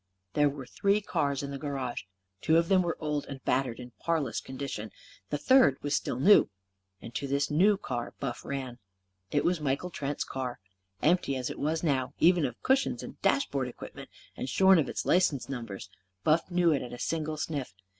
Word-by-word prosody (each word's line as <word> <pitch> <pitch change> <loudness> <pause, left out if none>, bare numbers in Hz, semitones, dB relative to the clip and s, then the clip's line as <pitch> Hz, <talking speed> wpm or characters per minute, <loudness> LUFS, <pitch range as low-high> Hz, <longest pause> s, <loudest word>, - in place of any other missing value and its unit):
There 145 -1 +4
were 140 -2 -7
three 200 +9 +1
cars 145 -9 -1
in 140 - -4
the 140 - -5
garage. 135 -7 -4 0.4
Two 160 - +4
of 170 0 +2
them 190 -2 +5
were 170 -2 -2
old 150 -2 -2
and 135 -1 -7
battered 125 -3 +1
and 125 0 -9
in - - -32
parlous 160 -7 0
condition. 130 -5 -5 0.4
The - - -1
third 250 - +5
was 145 0 +1
still - - -2
new. 200 +10 +6 0.5
And 115 - -8
to 140 +4 -3
this 140 +2 0
new 195 +7 +4
car 125 -11 -4
Buff 130 -3 -4
ran. 130 -3 -5 0.5
It 145 - +1
was 175 -2 +1
Michael 145 +5 -1
Trent's 145 -2 -3
car. 130 -2 -4 0.5
Empty 165 -4 +3
as 125 -1 -2
it - - -8
was 155 +3 -1
now 135 -4 0
even 175 -2 +4
of 120 - -5
cushions 265 +1 +2
and - - -10
dashboard 140 - +1
equipments, 125 - -10 0.2
and 130 - -4
shorn 190 +4 +6
of 150 - 0
its - - -3
license 145 -9 +2
numbers 115 -6 -6 0.4
Buff 160 +4 +2
knew 175 -2 +3
it 145 - +1
at 125 - -7
a - - -6
single 155 +2 -2
sniff. 140 -9 -4
145 Hz, 195 wpm, -29 LUFS, 130-165 Hz, 0.5 s, new